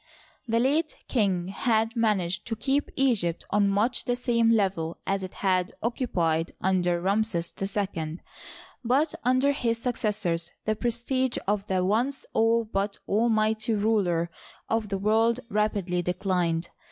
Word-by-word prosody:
— - - -34
The 230 0 +2
late 295 +6 +1
king 190 -7 +1
had 225 +2 +1
managed 200 -6 0
to 225 - -2
keep 270 +6 0
Egypt 220 -11 +1
on 205 -1 +3
much 215 +5 +1
the 245 - +1
same 235 -2 +2
level 190 -7 +1
as 195 0 0
it 185 -1 -7
had 185 -1 +2
occupied 170 - 0
under 180 -2 +1
Ramses 195 -2 0
II, 190 -5 -2 0.7
but 275 +6 +2
under 255 +3 +3
his 235 -5 0
successors 210 -8 -1 0.2
the 215 - +1
prestige 245 +2 -1
of 205 0 0
the 185 -1 +1
once 245 +8 0
all 225 +1 +3
but 200 -1 -2
almighty 220 0 +2
ruler 195 -6 +1 0.4
of 225 -2 -1
the 195 - -1
world 225 +4 +2
rapidly 200 -4 0
declined. 180 -2 -1
210 Hz, 140 wpm, -27 LUFS, 185-235 Hz, 0.7 s, on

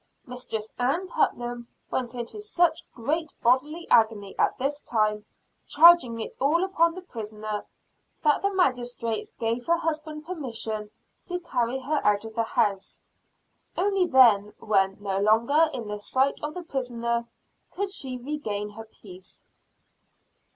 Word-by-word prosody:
Mistress 235 -4 -5
Ann 285 +10 0
Putnam 240 - -1 0.2
went 250 -1 -2
into 240 - -6
such 350 -6 +1
great 305 +6 -2
bodily 295 +8 +2
agony 215 -3 +3
at - - +2
this 280 +3 -1
time, 215 -2 0 0.4
charging 315 -8 +6
it 220 - -5
all 310 +6 +3
upon 335 -3 +2
the 370 - -8
prisoner, 215 - -6 0.6
that 295 -2 +3
the 400 - +1
magistrates 245 - 0
gave 230 +1 -2
her 340 0 +4
husband 310 -2 -3
permission 225 -10 -4 0.4
to 360 -1 -2
carry 250 -7 -1
her 280 +3 -1
out 205 +1 +2
of 220 - -8
the 230 - 0
house. 200 -3 -1 0.7
Only 390 -1 +2
then, 220 -7 +5
when 195 -2 +1
no 195 -1 -2
longer 235 +10 +4
in 245 -6 -5
the 210 0 -4
sight 265 +6 0
of 300 +2 -4
the 360 - -5
prisoner, 235 -5 -2 0.4
could 400 +1 -3
she 265 -9 -4
regain 230 -7 -4
her 225 +2 -9
peace. 190 -4 -14
250 Hz, 140 wpm, -26 LUFS, 220-315 Hz, 0.7 s, charging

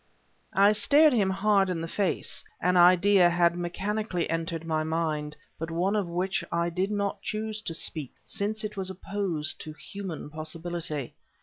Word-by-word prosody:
I 200 +2 +6
stared 280 +9 +5
him 205 -5 +2
hard 195 0 +2
in 180 -2 -1
the 165 - -4
face; 195 +2 -1 0.2
an 180 +1 +2
idea 180 +1 +6
had 175 0 +3
mechanically 185 +1 -2
entered 165 0 -2
my 155 -1 0
mind, 155 -2 -2 0.2
but 165 +1 -4
one 180 +5 0
of 205 -4 0
which 180 +1 -1
I 170 0 0
did 185 +3 -1
not 200 -1 -2
choose 215 0 -3
to 165 -6 -4
speak, 155 -4 -2
since 215 +2 -2
it 215 0 -4
was 190 -1 -2
opposed 190 -5 -2
to 155 - -7
human 175 -3 -7
possibility. 155 -2 -3
180 Hz, 165 wpm, -27 LUFS, 165-200 Hz, 0.2 s, I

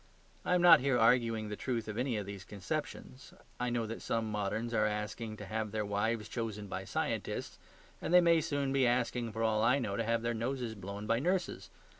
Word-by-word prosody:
I 180 - +2
am 175 - +2
not 175 -2 +9
here 130 -1 +2
arguing 115 -2 +3
the 105 - -3
truth 115 -1 -3
of 110 - -4
any 125 -1 0
of 105 - -3
these 100 -1 -7
conceptions; 90 -9 -6 0.2
I 125 0 0
know 120 -1 0
that 115 +1 -6
some 115 -1 -1
moderns 105 +3 -2
are 110 -1 +3
asking 105 +1 -4
to 105 - -7
have 110 +2 -3
their 110 0 -1
wives 105 +2 -1
chosen 110 -3 -4
by 95 -1 -5
scientists, - - -3 0.4
and - - -3
they 180 - +8
may 170 -2 +4
soon 140 -2 -1
be 135 -2 +3
asking, 120 -1 0
for 110 +2 -3
all 110 -1 +2
I 125 +5 +4
know, 110 -7 -2
to 115 - 0
have 115 +1 0
their 120 0 0
noses 120 0 -2
blown 100 0 -7
by 115 +2 +2
nurses. 180 +5 -1
115 Hz, 215 wpm, -33 LUFS, 105-125 Hz, 0.4 s, not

